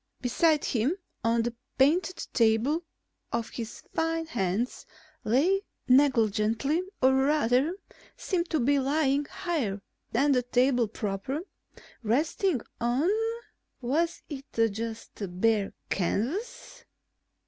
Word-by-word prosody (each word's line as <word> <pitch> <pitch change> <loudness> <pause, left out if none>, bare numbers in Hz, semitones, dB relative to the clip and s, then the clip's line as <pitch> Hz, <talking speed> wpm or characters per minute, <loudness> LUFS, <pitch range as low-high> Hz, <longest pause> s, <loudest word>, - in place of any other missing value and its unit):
Beside 300 +5 +2
him 255 - 0 0.3
on 230 0 +2
the 240 0 -2 0.2
painted 340 +7 +2
table 225 +3 +3
one 325 +2 0 0.5
of 230 -1 -1
his 230 -1 -7
fine 325 0 0
hands 215 - -2 0.4
lay 315 - +3 0.3
negligently 250 - +3 0.2
or 260 0 +6
rather, 275 +2 +2 0.4
seemed 350 -3 -1
to 315 - +1
be 280 +3 +3
lying 280 +1 +1
higher 275 - -2 0.3
than 275 +5 +3
the 255 -2 +4
table 245 -1 +2
proper, 210 +7 -3 0.6
resting 285 - +1 0.2
on... 250 +9 +2 0.7
was 315 +7 0
it 275 -3 -7 0.3
just 225 +2 -5 0.3
bare 215 -2 +2 0.2
canvas? 275 - -2
260 Hz, 105 wpm, -28 LUFS, 230-310 Hz, 0.7 s, or